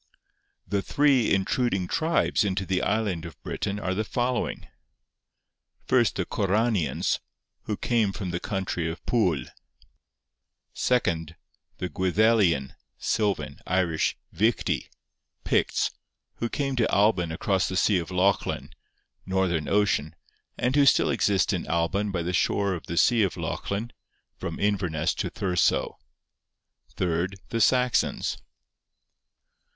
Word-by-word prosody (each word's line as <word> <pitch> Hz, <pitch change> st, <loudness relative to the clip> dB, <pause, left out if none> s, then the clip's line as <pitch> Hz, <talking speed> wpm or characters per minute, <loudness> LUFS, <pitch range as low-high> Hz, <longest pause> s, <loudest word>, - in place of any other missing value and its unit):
'The 100 Hz, -1 st, 0 dB
three 140 Hz, -2 st, +3 dB
intruding 95 Hz, 0 st, +1 dB
tribes 165 Hz, -, +1 dB
into 95 Hz, -1 st, -1 dB
the 95 Hz, 0 st, 0 dB
island 100 Hz, -7 st, 0 dB
of 85 Hz, -4 st, -9 dB
Britain 100 Hz, +1 st, -3 dB
are 95 Hz, -2 st, -1 dB
the 105 Hz, +3 st, -1 dB
following: 120 Hz, +3 st, -2 dB, 1.2 s
First, -, -, +3 dB
the -, -, -1 dB
Corranians, 100 Hz, -, 0 dB, 0.5 s
who 105 Hz, -, -2 dB
came 115 Hz, -4 st, +1 dB
from 95 Hz, -3 st, -5 dB
the 85 Hz, -, -2 dB
country 95 Hz, -5 st, -2 dB
of 80 Hz, -, -8 dB
Pwyl. 95 Hz, -, +1 dB, 1.3 s
Second, 85 Hz, -10 st, 0 dB, 0.4 s
the 90 Hz, -, -3 dB
Gwyddelian 95 Hz, -, +2 dB, 0.2 s
(silvan, 105 Hz, -3 st, -1 dB
Irish) 85 Hz, -3 st, +1 dB, 0.2 s
Fichti 110 Hz, +3 st, 0 dB, 0.5 s
(Picts), -, -, +1 dB, 0.5 s
who 120 Hz, -, -2 dB
came 135 Hz, 0 st, -2 dB
to 115 Hz, -, +2 dB
Alban 100 Hz, -5 st, +3 dB
across 95 Hz, +2 st, 0 dB
the 95 Hz, -, -2 dB
sea 100 Hz, -2 st, +3 dB
of 85 Hz, -, -6 dB
Lochlin 95 Hz, +2 st, 0 dB, 0.6 s
(Northern 95 Hz, -5 st, 0 dB
Ocean), 100 Hz, -7 st, +1 dB, 0.4 s
and 125 Hz, +2 st, 0 dB
who 140 Hz, -1 st, +5 dB
still -, -, +4 dB
exist 100 Hz, -3 st, +2 dB
in -, -, -3 dB
Alban 85 Hz, +6 st, 0 dB
by 90 Hz, -3 st, -2 dB
the 90 Hz, +2 st, -2 dB
shore 100 Hz, +1 st, +1 dB
of 85 Hz, -, -7 dB
the 85 Hz, -, -4 dB
sea 120 Hz, +3 st, +4 dB
of 95 Hz, -4 st, 0 dB
Lochlin 105 Hz, +4 st, -3 dB, 0.4 s
(from -, -, -5 dB
Inverness 90 Hz, -6 st, 0 dB
to -, -, -3 dB
Thursoe). 90 Hz, -3 st, 0 dB, 1.0 s
Third, 90 Hz, +2 st, -1 dB
the 115 Hz, -, -1 dB
Saxons 125 Hz, +1 st, +2 dB
95 Hz, 125 wpm, -26 LUFS, 90-110 Hz, 1.3 s, who